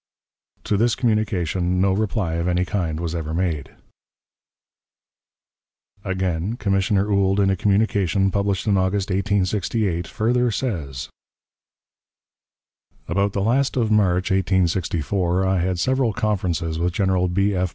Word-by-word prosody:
To 105 - 0
this 115 +2 +2
communication 95 -6 0
no 95 0 +3
reply 100 -4 -1
of 85 +1 -1
any 90 0 +1
kind 85 -5 -2
was 85 -1 -3
ever 80 -2 -3
made. 85 -6 -1 2.3
Again, 95 +1 -2
Commissioner 100 -1 +1
Ould, 100 0 +2
in 95 -1 +3
a - - +1
communication 100 -1 +1
published 100 -1 -1
in 100 -3 +2
August, 95 +1 0
1868, 100 -1 0
further 120 +3 +1
says: 85 - -3 2.0
"About 100 +3 0
the 100 - -1
last 130 +5 +1
of 115 -3 +1
March, 95 -4 +2
1864, 90 -1 0
I 95 -1 +1
had 90 +1 -1
several 130 +4 +1
conferences 90 -7 -1
with 85 +1 0
General 95 -1 +1
B. 100 +3 +1
F. 90 -1 0
95 Hz, 125 wpm, -22 LUFS, 90-105 Hz, 2.3 s, no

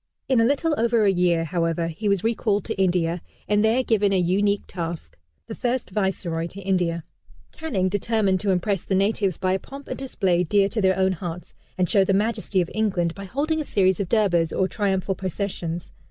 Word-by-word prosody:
In 260 -4 +3
a - - +4
little 290 +5 +1
over 230 -1 +3
a 200 - +5
year, 175 -2 +2
however, 165 0 -1
he 185 +6 -2
was 200 -2 +1
recalled 215 -3 0
to 220 -3 -2
India, 175 -2 +1 0.3
and 210 +2 +2
there 230 +4 +3
given 210 -4 +2
a 195 - +3
unique 200 +3 +1
task. 165 - -6 0.3
The - - -7
first 245 -1 -2
Viceroy 185 -4 -1
to 190 - -10
India, 180 -4 0 0.5
Canning, 215 -13 -1
determined 205 0 +1
to 205 - -2
impress 190 0 +1
the 190 - -1
natives 195 -1 +1
by 185 0 0
a 190 - 0
pomp 275 +6 -11
and - - -5
display 190 -9 0
dear 195 +3 +3
to 220 - -1
their 190 -1 +3
own 190 0 +3
hearts, 175 -1 -6 0.2
and 180 -1 +2
show 195 +2 +4
the 190 0 +1
majesty 210 -2 0
of 175 - -4
England, 190 -6 0
by 195 +1 -8
holding 305 - -1
a - - -2
series 190 - +2
of 195 -3 -2
Durbars, 175 -7 +2
or 190 - +1
triumphal 195 -1 -1
processions. 180 -3 -4
195 Hz, 200 wpm, -24 LUFS, 180-215 Hz, 0.5 s, a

